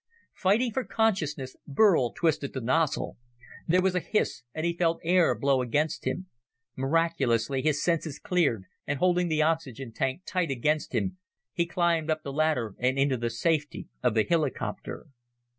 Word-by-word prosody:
Fighting 220 +6 +2
for 260 - 0
consciousness, 175 - -1
Burl 145 - +4
twisted 155 -4 0
the 130 - -3
nozzle. 140 +6 0 0.5
There 180 +2 +3
was 190 -1 +2
a 180 - +1
hiss 180 - -1
and 160 +5 -3
he 170 - +1
felt 165 -1 +1
air 170 -6 +4
blow 135 +2 +2
against 145 +6 -1
him. 185 - -2 0.5
Miraculously, 135 -4 +1
his 150 -1 +1
senses 165 -4 0
cleared, 150 - +1 0.2
and 145 - -1
holding 180 +2 +2
the 155 -2 +2
oxygen 135 -6 -2
tank 135 +9 -2
tight 180 -3 -1
against 150 +4 0
him, 185 -1 -1 0.3
he 170 -1 0
climbed 170 -2 +1
up 155 0 0
the 140 - -5
ladder 145 -8 +1
and 130 +2 +1
into 135 -1 +2
the 120 -1 -2
safety 150 +5 -1
of 125 -3 +1
the 110 - +4
helicopter. 155 -3 -2
155 Hz, 160 wpm, -28 LUFS, 135-170 Hz, 0.5 s, Burl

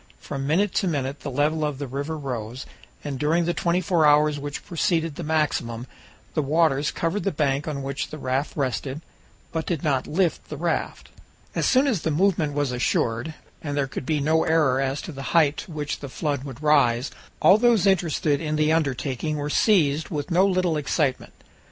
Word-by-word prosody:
From 135 0 -5
minute 185 +6 +2
to 190 - +1
minute 140 -3 -2
the 145 - -5
level 150 +4 +1
of 150 -2 -1
the 140 - -4
river 140 +4 -4
rose, 125 -3 -5 0.4
and 140 -3 -4
during 165 +4 +2
the 175 - 0
twenty 170 +1 +1
four 170 -2 +2
hours 150 0 +4
which 145 0 -6
preceded 165 -2 0
the 160 - -7
maximum 140 -7 -1 0.5
the 155 - +1
waters 150 -1 +2
covered 170 +5 -2
the 195 - 0
bank 145 -1 0
on 140 -3 -3
which 140 +1 -3
the 155 - -7
raft 135 +2 -2
rested, 135 +1 -2 0.5
but 160 -1 -3
did 165 -5 -2
not 140 -4 0
lift 170 -1 0
the 150 - -5
raft. 170 +2 -2 0.4
As - - 0
soon 260 +2 +4
as 230 - 0
the - - -1
movement 160 -2 +1
was 145 -2 0
assured, 125 +3 -1 0.3
and 145 -2 -4
there 140 - +2
could 130 -1 -7
be 155 -2 +1
no 160 +3 +2
error 150 -5 +2
as 135 +1 -2
to - - -6
the 135 -2 -8 0.2
height 150 -3 +4
to 200 - -7
which 150 -2 -4
the 140 - -7
flood 140 -1 -2
would 135 +1 -9
rise, 135 -4 +3 0.3
all 195 +3 +6
those 235 -4 +4
interested 165 -6 +2
in 155 -1 -1
the 155 +1 +2
undertaking 145 -1 -1
were 145 0 -3
seized 155 -9 +3
with 150 +3 -4
no 185 +3 +4
little 185 -4 +1
excitement. 145 -1 -1
150 Hz, 195 wpm, -24 LUFS, 140-165 Hz, 0.5 s, all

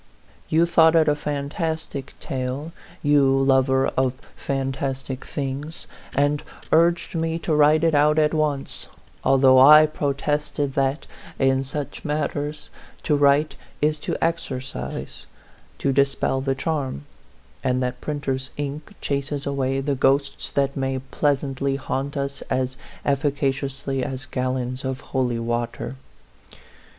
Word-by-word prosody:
You 165 +2 +4
thought 165 -1 +5
it 160 -1 +5
a 150 - +5
fantastic 145 0 -3
tale, 130 +4 -4 0.3
you 140 -2 +4
lover 135 0 +3
of 130 -1 +1 0.2
fantastic 135 -1 -3
things, 140 +3 -4 0.3
and 145 +1 +2 0.3
urged 170 +1 +3
me 165 -1 -1
to 165 -1 -2
write 150 +1 +5
it 165 -1 +3
out 150 +1 +4
at 155 0 +3
once, 150 -3 -1 0.3
although 130 -1 +6
I 150 +3 +9
protested 145 -1 -1
that, 135 +2 0 0.3
in 135 0 +2
such 140 +2 -5
matters, 150 0 -3 0.3
to 150 - +2
write 145 +1 +3 0.2
is 150 0 +1
to - - -3
exorcise, 130 - -4 0.5
to 135 - 0
dispel 135 -1 +1
the 135 0 0
charm; 135 - -2 0.6
and 125 0 +1
that 125 0 -3
printers' 135 -3 -3
ink 145 +6 -5
chases 140 0 -2
away 135 -1 0
the 140 +1 0
ghosts 140 +1 +1
that 140 -1 0
may 135 -1 -1
pleasantly 135 0 -1
haunt 135 +1 -3
us 140 0 -3
as 130 0 0 0.3
efficaciously 135 -1 -1
as 130 +2 -4
gallons 130 -1 -2
of 130 0 -3
holy 125 -3 -1
water. 120 +2 -3
140 Hz, 125 wpm, -23 LUFS, 135-150 Hz, 0.6 s, I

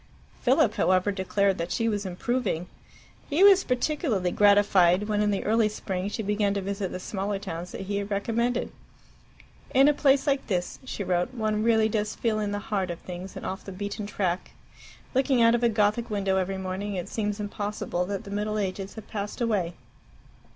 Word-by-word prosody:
Philip, 260 -3 +3
however, 185 +1 +2
declared 195 0 0
that 170 - -3
she 230 - 0
was 205 -3 -1
improving. 185 -1 -1 0.6
He 315 +6 +3
was 390 -1 +8
particularly 250 - 0
gratified 200 -2 +4
when 210 -1 +1
in 210 - +2
the 200 -1 0
early 220 0 +3
spring 195 -2 -3
she 220 - -4
began 205 0 +1
to 200 - -1
visit 195 -1 -3
the 185 - -5
smaller 195 +1 -3
towns 180 -3 -6
that - - -6
he 200 +1 -2
had 200 0 -3
recommended. 230 +4 0 1.0
"In 270 +2 +7
a 295 - +5
place 275 -1 +3
like 275 -1 0
this," 180 -4 -2
she 235 -5 -4
wrote, 180 +5 0
"one 215 -2 0
really 220 -1 +4
does 210 -1 -1
feel 220 -2 0
in 205 -1 -1
the 205 - -1 0.2
heart 190 -3 0
of 170 - -4
things, 180 +2 -8
and - - -7
off 190 - -4
the 195 - -8
beaten 205 +2 -5
track. 185 -3 -2 0.6
Looking 265 -1 +2
out 230 0 +6
of 240 - +1
a 235 - +4
Gothic 215 +2 +1
window 195 -2 0
every 190 +1 -1
morning, 190 +2 -4
it 180 -2 -4
seems 210 -1 -2
impossible 205 -3 -3
that 200 0 -4
the 200 - -9
middle 210 +1 -1
ages 195 -1 -3
have 220 - -9
passed 205 +2 -5
away." 205 -8 0
205 Hz, 195 wpm, -27 LUFS, 190-225 Hz, 1.0 s, was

